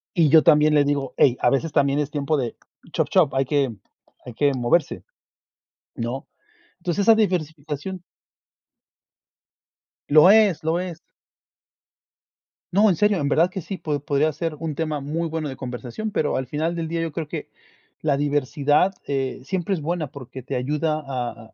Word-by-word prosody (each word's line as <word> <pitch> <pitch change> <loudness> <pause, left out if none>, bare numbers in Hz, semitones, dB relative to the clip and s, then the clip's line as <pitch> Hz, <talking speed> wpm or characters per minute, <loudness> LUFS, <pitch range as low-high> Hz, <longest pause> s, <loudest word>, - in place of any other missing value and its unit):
Y 165 -4 +4
yo 160 +2 +7
también 150 -1 +5
le 145 -1 +5
digo: 140 -2 -1
"Hey, 125 -3 +4
a - - +3
veces 145 +5 0
también 140 0 +2
es 145 -1 -2
tiempo 150 0 0
de, 120 -4 -3 0.4
chop, - - 0
chop, 180 -7 +3
hay 135 0 +2
que 140 -1 +1 0.5
hay 125 - -8
que 140 +4 +2
moverse", 130 +5 0 0.9
¿no? 120 +2 -4 0.5
Entonces 180 +2 -1
esa 225 +2 +6
diversificación 165 -3 -2 2.1
Lo 155 +5 +8
es, 205 -7 +4
lo 160 +2 +1
es. 180 -3 -5 1.7
No, 205 +4 +5
en 185 - +2
serio, 210 +3 +2
en 140 -1 0
verdad 165 +4 +3
que 190 +1 -5
sí, 195 +4 -6
po 150 -4 -2
podría 145 +2 +1
ser 165 +1 -4
un 160 -2 -4
tema 155 -1 -2
muy 155 +4 -3
bueno 160 -2 -3
de 135 - -6
conversación, 130 - -6
pero, 150 -8 0
al 130 - -2
final 160 +5 -2
del 165 -1 -3
día 165 0 -2
yo 165 -1 -3
creo 160 0 -4
que - - -6 0.5
la 150 -3 +1
diversidad, 145 +4 +1
eh, 135 -2 -2
siempre 190 +5 -2
es 175 - -2
buena, 165 0 -2
porque, 130 -1 -10
te 135 +1 -4
ayuda 150 +4 -1
a 120 -4 -5
150 Hz, 170 wpm, -23 LUFS, 140-170 Hz, 2.1 s, Lo